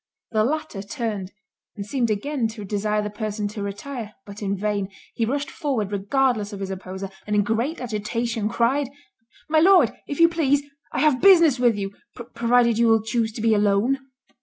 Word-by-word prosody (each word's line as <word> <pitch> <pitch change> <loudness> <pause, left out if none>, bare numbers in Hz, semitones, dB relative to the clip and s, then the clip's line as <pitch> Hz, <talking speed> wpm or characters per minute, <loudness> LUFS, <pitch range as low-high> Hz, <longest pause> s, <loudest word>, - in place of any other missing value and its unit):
The 215 -2 +2
latter 275 -6 -2
turned, 205 -3 -4 0.4
and 200 -2 -6
seemed 235 +1 0
again 235 +4 -1
to 220 -2 -8
desire 210 +1 -1
the 210 - -4
person 210 0 -3
to 210 0 -6
retire, 210 +2 -6
but 200 +1 -10
in 200 -1 -1
vain; 200 -1 -1 0.2
he 225 - -1
rushed 285 +3 -2
forward 255 - -2
regardless 210 +1 +1
of 200 - -7
his 195 -1 -4
opposer, 190 +1 -6 0.2
and 210 - 0
in 205 - +4
great 235 +10 -1
agitation, 230 -1 -2
cried, 255 +4 +1 0.6
"My 315 0 +3
Lord, 345 - +6 0.2
if 285 - -5
you 335 - +8
please, 290 -4 +1 0.3
I - - -1
have 300 -4 +3
business 335 -8 +6
with 240 -3 +4
you, 195 -1 -3 0.4
provided 235 -1 +3
you 235 - +4
will 225 -1 +4
chuse 225 0 0
to 225 - -6
be 225 0 +3
alone." 210 +6 +2
225 Hz, 185 wpm, -23 LUFS, 205-265 Hz, 0.6 s, you